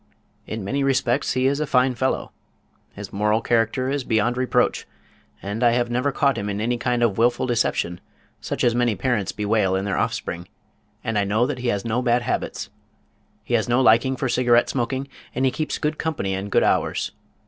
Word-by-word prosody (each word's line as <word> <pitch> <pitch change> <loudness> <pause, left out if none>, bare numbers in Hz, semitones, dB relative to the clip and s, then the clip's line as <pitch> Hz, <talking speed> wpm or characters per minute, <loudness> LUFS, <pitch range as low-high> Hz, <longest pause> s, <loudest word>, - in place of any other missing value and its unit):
In 110 -2 -4
many 135 +8 -1
respects 130 -3 +1
he 130 0 +1
is 140 +2 +2
a 155 - -1
fine 130 0 +3
fellow. 130 +2 -1 0.6
His 100 -1 -9
moral 105 +2 +2
character 120 +3 +1
is 140 -1 -1
beyond 115 +1 +1
reproach, 130 0 +1 0.6
and 105 +4 -3
I 120 -1 +5
have 120 0 0
never 125 +4 +1
caught 140 -1 +1
him 100 +1 -3
in 100 0 -3
any 120 +2 -1
kind 120 -1 0
of 115 - +4
a - - -9
wilful 120 +4 +2
deception 115 -7 0 0.4
such - - -3
as 120 - +4
many 120 -2 +1
parents 105 -7 -1
bewail 105 -2 +1
in 95 +1 -1
their 100 -3 -1
offspring, 85 +1 -3 0.6
and 115 -2 0
I - - +2
know 105 +4 +2
that 130 -1 -3
he 125 - -3
has 105 -3 -1
no 115 +2 0
bad 120 -1 +2
habits. - - -3 0.7
He - - -5
has 115 0 +1
no 120 +2 +3
liking 130 +2 +4
for 130 - -2
cigarette 120 -1 +3
smoking, 130 +2 -2 0.3
and 130 +2 +1
he 130 - +3
keeps 155 +3 -3
good 155 +1 -2
company 145 -12 -2
and 95 +1 -4
good - - +3
hours. - - +1
120 Hz, 205 wpm, -23 LUFS, 105-130 Hz, 0.7 s, I